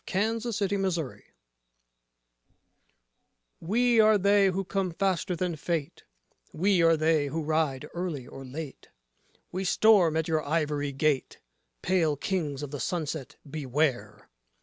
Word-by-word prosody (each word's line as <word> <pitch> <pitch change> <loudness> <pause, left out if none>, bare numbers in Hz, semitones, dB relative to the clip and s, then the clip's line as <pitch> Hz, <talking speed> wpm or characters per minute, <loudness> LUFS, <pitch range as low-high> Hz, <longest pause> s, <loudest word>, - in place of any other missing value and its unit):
WAR 190 - +1
SONG 220 +3 +1
OF - - -7
THE 235 0 -3
SARACENS 190 - -2 2.4
We 235 +6 +2
are 215 -1 +6
they 200 0 +4
who 190 +1 -1
come 195 0 -1
faster 185 0 -1
than 175 0 -2
fate: 155 -1 -4 0.5
we 185 +2 +2
are 165 -1 +5
they 155 -2 +2
who 160 +3 -3
ride 155 -3 0
early 170 -7 -4
or 135 - -10
late: 135 +2 -8 0.6
We 185 +2 -3
storm 185 -4 +4
at 160 - -1
your 160 -2 0
ivory 145 -2 -1
gate: 140 0 0 0.5
Pale 165 -5 +1
Kings 150 -4 -2
of 145 - -6
the 145 - -5
Sunset, 160 -5 -3
beware! 140 -2 -2
165 Hz, 135 wpm, -28 LUFS, 150-190 Hz, 2.4 s, are